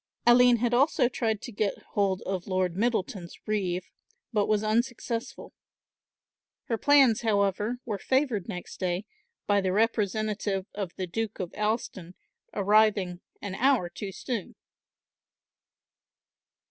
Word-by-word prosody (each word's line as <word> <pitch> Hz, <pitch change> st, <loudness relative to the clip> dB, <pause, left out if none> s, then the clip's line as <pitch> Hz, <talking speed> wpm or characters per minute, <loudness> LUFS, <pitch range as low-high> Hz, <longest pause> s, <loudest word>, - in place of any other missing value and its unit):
Aline 245 Hz, 0 st, +7 dB
had 240 Hz, +1 st, 0 dB
tried 240 Hz, -, +3 dB
also 275 Hz, -3 st, +3 dB
to 225 Hz, -1 st, -2 dB
get 205 Hz, -2 st, -2 dB
hold 195 Hz, -2 st, 0 dB
of 185 Hz, -2 st, -3 dB
Lord 185 Hz, -2 st, 0 dB
Middleton's 195 Hz, -5 st, -1 dB
reeve, 185 Hz, -4 st, -1 dB, 0.5 s
but 210 Hz, -2 st, +2 dB
was 215 Hz, 0 st, +2 dB
unsuccessful; 230 Hz, +1 st, -2 dB, 1.1 s
her 230 Hz, -, -2 dB
plans, 275 Hz, -6 st, +5 dB
however, 210 Hz, +1 st, +1 dB
were 210 Hz, -4 st, -3 dB
favoured 260 Hz, -7 st, 0 dB
next 180 Hz, -4 st, -7 dB
day 180 Hz, +2 st, -1 dB, 0.4 s
by 205 Hz, -1 st, +3 dB
the 190 Hz, -1 st, 0 dB
representative 210 Hz, -2 st, 0 dB
of 195 Hz, -4 st, -5 dB
the 185 Hz, -, -3 dB
Duke 220 Hz, +4 st, -4 dB
of 180 Hz, -3 st, -4 dB
Alston 210 Hz, -5 st, -2 dB, 0.4 s
arriving 200 Hz, -3 st, +2 dB, 0.2 s
an 200 Hz, -2 st, -4 dB
hour 240 Hz, -4 st, +2 dB
too 195 Hz, +3 st, -6 dB
soon. 230 Hz, 0 st, -5 dB
210 Hz, 120 wpm, -28 LUFS, 190-230 Hz, 1.1 s, Aline